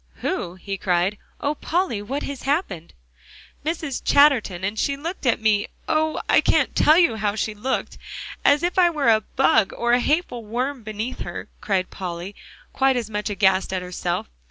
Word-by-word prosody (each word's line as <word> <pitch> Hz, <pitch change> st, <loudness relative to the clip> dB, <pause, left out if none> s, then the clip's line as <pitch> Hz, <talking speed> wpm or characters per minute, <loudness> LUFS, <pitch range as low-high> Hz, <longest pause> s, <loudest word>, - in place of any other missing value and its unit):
"Who?" 175 Hz, +1 st, -2 dB
he 195 Hz, +1 st, -6 dB
cried. 180 Hz, +3 st, +1 dB, 0.2 s
"Oh, 290 Hz, -, 0 dB
Polly! 325 Hz, -, -1 dB
what 270 Hz, +8 st, -4 dB
has 280 Hz, -2 st, -5 dB
happened?" 265 Hz, -, -2 dB, 0.7 s
"Mrs. 315 Hz, -3 st, -3 dB
Chatterton. 255 Hz, -11 st, +4 dB
And 205 Hz, +3 st, -2 dB
she 280 Hz, 0 st, 0 dB
looked 325 Hz, 0 st, -5 dB
at 235 Hz, -, +3 dB
me 215 Hz, -2 st, +2 dB, 0.2 s
oh! 315 Hz, 0 st, +1 dB
I -, -, +5 dB
can't -, -, +2 dB
tell 310 Hz, +2 st, +5 dB
you 335 Hz, -11 st, +4 dB
how 210 Hz, -1 st, -1 dB
she 220 Hz, 0 st, -2 dB
looked; 235 Hz, +6 st, -3 dB, 0.4 s
as 290 Hz, +3 st, +4 dB
if 355 Hz, +2 st, +1 dB
I 350 Hz, -1 st, +6 dB
were 295 Hz, -7 st, +1 dB
a 220 Hz, -1 st, +5 dB
bug, 255 Hz, -3 st, +2 dB
or 240 Hz, 0 st, +1 dB
a 245 Hz, -, +5 dB
hateful 285 Hz, -3 st, 0 dB
worm 250 Hz, +5 st, -3 dB
beneath 215 Hz, +3 st, -5 dB
her," -, -, -6 dB
cried 190 Hz, -3 st, -1 dB
Polly, 180 Hz, +1 st, -6 dB, 0.4 s
quite 270 Hz, 0 st, +3 dB
as 225 Hz, -3 st, -3 dB
much 210 Hz, +1 st, -2 dB
aghast 190 Hz, -2 st, +2 dB
at 185 Hz, -1 st, -2 dB
herself. 180 Hz, -, -3 dB
230 Hz, 180 wpm, -23 LUFS, 200-285 Hz, 0.7 s, I